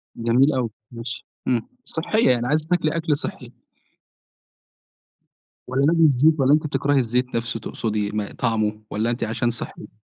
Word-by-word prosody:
جميل 125 +5 +3
أوي، 120 -3 0 0.2
ماشي 115 -1 -6 0.2
إمم، 120 -3 0 0.2
صحيّة، 195 - +1
يعني 120 0 +1
عايزة 155 +2 +1
تاكلي 165 -2 +1
أكل 155 -3 +1
صحّي. - - -4 2.2
والَّا 135 +2 +1
لازم 165 +1 +4
الزيت؟ 150 +3 +4
والَّا 135 +2 +4
أنتِ 155 0 +2
بتكرهي 140 0 +1
الزيت 125 0 0
نفْسه 115 -1 -1
تقصدي، 105 -1 -3
ما 105 -1 -2
طعمُه 110 -3 -1
والَّا 110 +3 -1
أنتِ 120 - -2
عشان 115 +2 0
صحّي؟ 120 - -4
امم. 105 +1 -15
125 Hz, 155 wpm, -23 LUFS, 115-145 Hz, 2.2 s, لازم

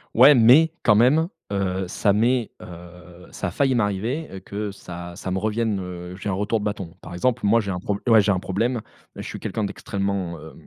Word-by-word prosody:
Ouais! 135 +5 +8
Mais 135 +8 +6
quand 105 - +5
même, 140 +10 +4 0.2
heu, 95 -1 -1
ça 100 +3 +1
m'est 115 +3 +1
heu, 90 0 -12
ça - - -4
a - - -4
failli 135 +5 +1
m'arriver 105 +2 -2
que 105 +1 -4
ça 90 -2 -9
ça 95 - -5
me 95 - 0
revienne 110 0 -1
heu, 90 0 -7
j'ai 95 - -7
un 100 - 0
retour 105 +4 0
de 105 - -5
bâton. 100 -5 -4
Par 85 - -10
exemple, 120 +6 0
moi 115 +3 +4
j'ai 100 -2 -4
un 90 - -3
problè 100 +2 -3
ouais, 110 -1 +8
j'ai 100 0 +2
un 90 - -1
problème. 115 +6 -1 0.3
Je - - -7
suis - - -7
quelqu'un 110 - -3
d'extrêmement, 100 -3 -3
heu, 80 +1 -11
100 Hz, 215 wpm, -23 LUFS, 90-115 Hz, 0.3 s, Ouais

